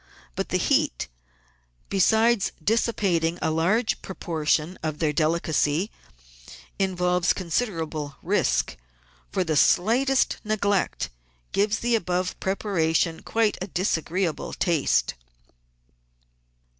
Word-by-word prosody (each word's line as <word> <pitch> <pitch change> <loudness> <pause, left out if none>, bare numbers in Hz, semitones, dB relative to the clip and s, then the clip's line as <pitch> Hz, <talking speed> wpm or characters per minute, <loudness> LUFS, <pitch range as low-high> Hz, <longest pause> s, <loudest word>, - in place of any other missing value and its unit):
Biit - - -2
the - - 0
heat, - - +1 0.8
besides 220 +2 +3
dissipat 200 -2 +1
ing 165 +2 0
a - - 0
large 190 +9 +1
proportion 165 -1 -1
of 155 -1 -3
their 155 -2 0
delicacy, 160 +2 +1 0.9
involves 180 -2 +2
consider 180 0 -1
able 150 -3 -6
risk, - - +1 0.5
for 190 - +1
the 160 -3 -1
slightest 250 - +3
neglect 205 -2 0 0.4
gives 205 +1 +1
the 240 0 +1
above 180 -3 -1
preparation 170 -4 0
quite 225 -2 0
a 185 - -3
disagreeable 180 -2 -1
taste. 165 -6 +1
180 Hz, 100 wpm, -25 LUFS, 160-205 Hz, 0.9 s, besides